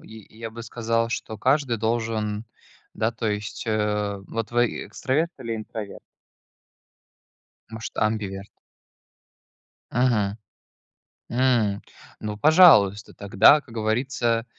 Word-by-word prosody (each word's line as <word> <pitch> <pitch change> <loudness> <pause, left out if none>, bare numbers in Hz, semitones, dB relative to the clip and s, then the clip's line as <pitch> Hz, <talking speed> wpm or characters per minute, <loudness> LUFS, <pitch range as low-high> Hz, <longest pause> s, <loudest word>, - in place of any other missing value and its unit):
я 110 -1 -12 0.2
я - - -6
бы 115 +1 -9
сказал, 115 0 -1
что 110 -2 -4
каждый 130 +2 +1
должен, 110 -1 -2 0.5
да, 110 +2 0
то 115 0 -4
есть, 105 0 -4
э 105 -2 0
Вот 115 -1 -4
вы, 120 0 +3 0.2
э, - - -9
экстраверт 130 +10 -1
или 115 -3 -4
интроверт? 110 -1 -7 1.7
Может, 110 -1 -8
амбиверт? 100 -2 -2 1.4
Мгм. 110 -5 +1 0.9
М. 120 -5 +1 0.4
Ну, 105 -1 -5
пожалуйста, 105 - +5
тогда, 105 +9 +5
как 120 - -16
говорится, 115 +1 0
110 Hz, 105 wpm, -24 LUFS, 105-120 Hz, 1.7 s, пожалуйста